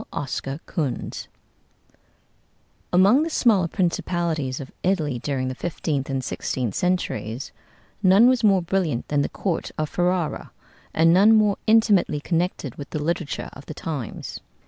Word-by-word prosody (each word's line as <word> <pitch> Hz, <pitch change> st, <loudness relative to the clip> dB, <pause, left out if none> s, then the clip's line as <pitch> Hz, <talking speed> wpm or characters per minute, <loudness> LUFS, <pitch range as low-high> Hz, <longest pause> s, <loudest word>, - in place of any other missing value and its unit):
OSCAR 135 Hz, 0 st, -4 dB
KUHNS 145 Hz, -8 st, -3 dB, 1.6 s
Among 195 Hz, +10 st, +5 dB
the 325 Hz, -, -1 dB
smaller 215 Hz, -, +3 dB
principalities 170 Hz, -6 st, -1 dB
of 135 Hz, -2 st, -8 dB
Italy 155 Hz, -9 st, 0 dB
during 130 Hz, 0 st, -2 dB
the 130 Hz, -, -2 dB
fifteenth 145 Hz, -2 st, -3 dB
and 135 Hz, -1 st, -2 dB
sixteenth 125 Hz, -4 st, -3 dB
centuries, 130 Hz, -, -2 dB, 0.5 s
none 200 Hz, +4 st, +6 dB
was 255 Hz, -2 st, +3 dB
more 195 Hz, -4 st, +4 dB
brilliant 170 Hz, -8 st, -1 dB
than 145 Hz, -1 st, +2 dB
the -, -, -1 dB
court 180 Hz, -5 st, -2 dB
of 155 Hz, -1 st, -1 dB
Ferrara, 175 Hz, -2 st, -1 dB, 0.4 s
and 165 Hz, +1 st, +4 dB
none 205 Hz, +5 st, +6 dB
more 210 Hz, -2 st, +3 dB
intimately 215 Hz, -8 st, +4 dB
connected 165 Hz, -4 st, -2 dB
with 140 Hz, -, -7 dB
the -, -, -3 dB
literature 165 Hz, -2 st, -3 dB
of 140 Hz, -, -13 dB
the 155 Hz, -, -7 dB
times. 145 Hz, -9 st, -5 dB
165 Hz, 140 wpm, -23 LUFS, 140-190 Hz, 1.6 s, none